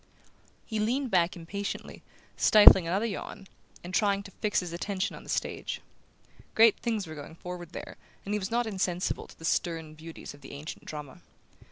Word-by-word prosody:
He 220 -2 -3
leaned 245 +4 0
back 175 -1 +3
impatiently, 195 +4 -5 0.3
stifling 200 -5 +8
another 195 +6 +1
yawn, 200 -2 -5 0.4
and 175 +1 -7
trying 200 0 +2
to 200 - -11
fix 210 0 0
his 175 -2 -6
attention 190 +2 -2
on - - -10
the - - -14
stage. - - -2 0.8
Great 225 -1 +7
things 225 -4 -1
were 160 - -8
going 150 +1 -9
forward 175 -1 -7
there, - - -7 0.3
and 200 - -2
he 210 - +1
was 190 - -3
not 240 +1 +1
insensible 185 -4 -1
to - - -16
the 160 - -8
stern 165 -1 -1
beauties 160 +1 -9
of 145 - -16
the 135 - -10
ancient 145 +3 -8
drama. 150 -3 -7
185 Hz, 180 wpm, -29 LUFS, 165-210 Hz, 0.8 s, stifling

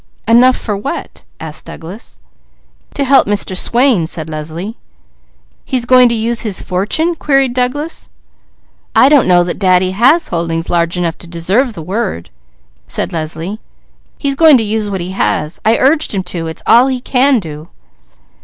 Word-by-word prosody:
"Enough 245 +3 +5
for 210 - -3
what?" 200 - -6
asked 155 -1 -7
Douglas. 165 +6 -10 0.8
"To 280 - 0
help 275 0 +4
Mr. 200 -2 -1
Swain," 235 -4 +2
said 160 -1 -3
Leslie. 160 +8 -6 0.9
"He's 255 -3 -2
going 250 0 +5
to 235 - 0
use 230 +1 -1
his 210 -5 -3
fortune?" 210 - -1
queried 275 -5 +1
Douglas. 255 +6 -3 0.9
"I 265 - +6
don't 285 -7 +4
know 175 -1 +4
that 175 - -4
Daddy 185 -1 +2
has 255 - +3
holdings 165 -1 -3
large 170 0 0
enough 170 -2 -2
to 175 - -11
deserve 190 +10 0
the 165 - -8
word," 190 - -4 0.6
said - - -2
Leslie. 165 +5 -4 0.6
"He's 280 -2 -1
going 310 -1 +6
to 230 - 0
use 215 0 -2
what 190 -2 -3
he 180 +2 -5
has. 155 -4 -2
I 225 +2 +3
urged 290 -3 +2
him 190 - -1
to; 165 -2 -4
it's 160 0 -7
all 240 +3 +5
he 260 -1 -1
can 260 +1 +2
do." 155 -3 -9
205 Hz, 165 wpm, -14 LUFS, 170-255 Hz, 0.9 s, I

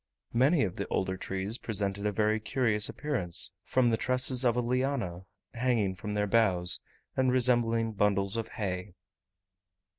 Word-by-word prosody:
Many 135 +6 +4
of 95 -4 -3
the - - -3
older 95 0 -1
trees 95 +4 -4
presented 100 -1 -2
a - - +1
very 110 +1 +1
curious 105 -1 0
appearance 120 - -2
from 125 -2 +2
the 115 - +2
tresses 130 +1 +3
of 120 -2 +3
a - - +1
liana 120 -7 -1 0.3
hanging 115 -5 +1
from 105 +2 -5
their 105 0 +1
boughs, 95 -5 +3 0.3
and 130 -1 +2
resembling 120 -3 +2
bundles 100 -1 +1
of 115 -1 -2
hay. 90 -2 -4
110 Hz, 150 wpm, -29 LUFS, 100-125 Hz, 0.3 s, Many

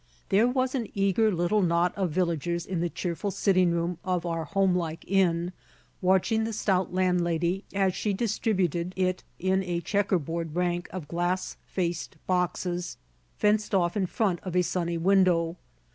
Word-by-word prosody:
There 210 +5 +4
was 255 0 0
an 245 -5 -1
eager 200 +2 +3
little 180 +4 +1
knot 175 0 +2
of 190 -3 0
villagers 170 0 -1
in 185 -3 -3
the 175 - 0
cheerful 175 +4 -3
sitting 185 -2 +3
room 170 0 -1
of 180 -2 -1
our 165 -1 -2
homelike 180 -2 0
inn, 180 -2 +2 0.5
watching 190 +4 +2
the 225 0 -2
stout 190 -3 0
landlady 180 0 +1
as 195 -2 +1
she 210 - -1
distributed 190 -5 0
it 185 -1 0
in 190 +1 +1
a 175 -2 -2
checker 195 +2 +1
board 165 0 -4
rank 175 0 0
of 180 -6 -6
glass 175 +3 -1
faced 175 -4 -3
boxes 180 -1 -1 0.4
fenced 210 -1 +2
off 175 -2 +2
in 195 -3 +1
front 190 -3 0
of 185 -2 -5
a 180 - +4
sunny 170 -1 -1
window. 175 -2 +3
180 Hz, 160 wpm, -27 LUFS, 170-195 Hz, 0.5 s, There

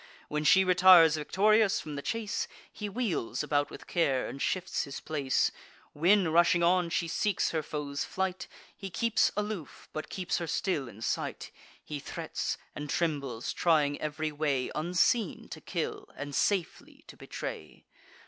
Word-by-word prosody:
When 150 0 -1
she 190 +6 +6
retires 180 -3 +7
victorious 205 +7 +3
from 155 - -7
the 140 - -4
chase, 225 +5 -2 0.3
He 210 - -5
wheels 190 - -2
about 145 -1 +1
with - - -11
care, 140 -7 +1
and 135 - -7
shifts 185 0 -1
his 140 - -7
place; 140 -4 0 0.4
When, 180 +3 +4
rushing 170 +1 +4
on, 175 0 +3
she 170 0 0
seeks 200 +4 0
her 160 - 0
foes 145 -1 -4
in - - -8
fight, 190 -1 -2 0.3
He 195 - -7
keeps 230 +4 +2
aloof, 210 -7 -5
but 155 - -5
keeps 185 -2 -2
her 170 - -4
still 155 -5 -1
in 110 +1 -11
sight: - - -3 0.3
He 150 -1 -5
threats, - - -4 0.2
and 150 0 -6
trembles, 140 -9 -1
trying 150 -4 +2
ev'ry 155 0 -2
way, 145 -4 -1
Unseen 180 +8 +1
to - - -8
kill, 420 -3 -4
and 145 0 -6
safely 280 - -1
to - - -13
betray. - - -7
165 Hz, 160 wpm, -30 LUFS, 145-190 Hz, 0.4 s, retires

